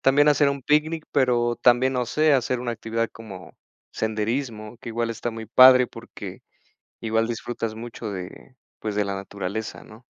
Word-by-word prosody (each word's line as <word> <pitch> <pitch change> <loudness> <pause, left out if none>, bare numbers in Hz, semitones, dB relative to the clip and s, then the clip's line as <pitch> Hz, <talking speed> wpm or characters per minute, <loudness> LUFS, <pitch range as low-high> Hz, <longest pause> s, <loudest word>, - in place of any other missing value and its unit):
también 145 +2 +4
hacer 145 -1 +4
un 140 -1 -3
picnic, 155 +2 +1
pero 120 -3 +2
también, 125 +2 +4
no 125 -2 -1
sé, 155 +4 +3
hacer 125 -2 +1
una 120 -1 -3
actividad 115 0 -2
como 100 -5 -11 0.4
senderismo, 110 +1 -3
que - - -9
igual 115 0 -1
está 115 +1 -3
muy 115 0 -7
padre 130 +2 +7
porque - - -10 0.6
igual 115 0 0
disfrutas 115 -1 -4
mucho 115 -1 -7
de, 95 +7 -9 0.2
pues, 105 -2 -4
de 105 -1 +1
la 100 - -2
naturaleza, 100 +2 -5
¿no? 110 +3 -15
115 Hz, 165 wpm, -24 LUFS, 110-130 Hz, 0.6 s, padre